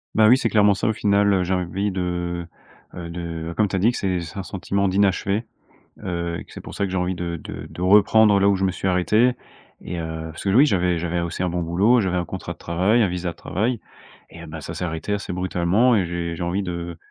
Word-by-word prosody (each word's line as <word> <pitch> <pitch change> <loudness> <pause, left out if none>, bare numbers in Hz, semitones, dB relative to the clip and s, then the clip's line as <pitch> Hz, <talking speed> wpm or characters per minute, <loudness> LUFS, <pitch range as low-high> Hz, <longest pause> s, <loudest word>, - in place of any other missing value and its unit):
Bah, 110 0 +6
oui, 125 +4 +7
c'est 115 - 0
clairement 105 -1 +4
ça, 100 - -2
au 110 - +1
final, 100 -1 +2
heu, 95 -2 +2
j'ai 95 - 0
envie 95 +3 -1
de, 90 -2 -3 0.5
heu, 85 -1 -6
de, 85 -1 -5
comme 105 -2 +2
tu - - -3
as - - 0
dit, 110 +6 +4
que - - -5
c'est 95 -2 -1
c'est 85 +3 -8
un 95 - -3
sentiment 100 +1 -1
d'inachevé. 100 +3 +1 0.6
Heu, 85 -1 -3
et - - -8
que - - -19
c'est - - -9
pour - - -10
ça, - - -1
que 95 - -5
j'ai 95 - -1
envie 90 0 -1
de 85 -1 -4
de - - -8
de 90 - -9
reprendre 105 +2 +5
là 100 +1 +4
où 100 - +3
je 95 - 0
me 95 - +1
suis 95 +1 -2
arrêté. 105 +7 +3 0.5
Et 85 0 -5
heu, 80 0 -5
parce - - -9
que 100 - 0
l 100 - +2
oui, 140 - +8
j'avais 90 - +1
j'avais 85 +1 -1
aussi 85 +2 -3
un 90 - 0
bon 90 0 -2
boulot, 100 +9 +3
j'avais 90 -3 0
un 90 - -1
contrat 90 -1 -6
de - - -25
travail, 95 +9 +1
un - - +3
visa 90 0 -3
de - - -13
travail, 110 +6 -1 0.5
et 85 - -12
heu, - - -10
bah, 80 +1 -7
ça 75 - -7
s'est - - -5
arrêté 85 +4 -3
assez 100 -1 -3
brutalement 95 +6 +2
et 95 -4 +2
j'ai 85 -1 -3
j'ai 85 - -4
envie 90 +4 -1
de 85 -2 -5
90 Hz, 265 wpm, -22 LUFS, 85-100 Hz, 0.6 s, oui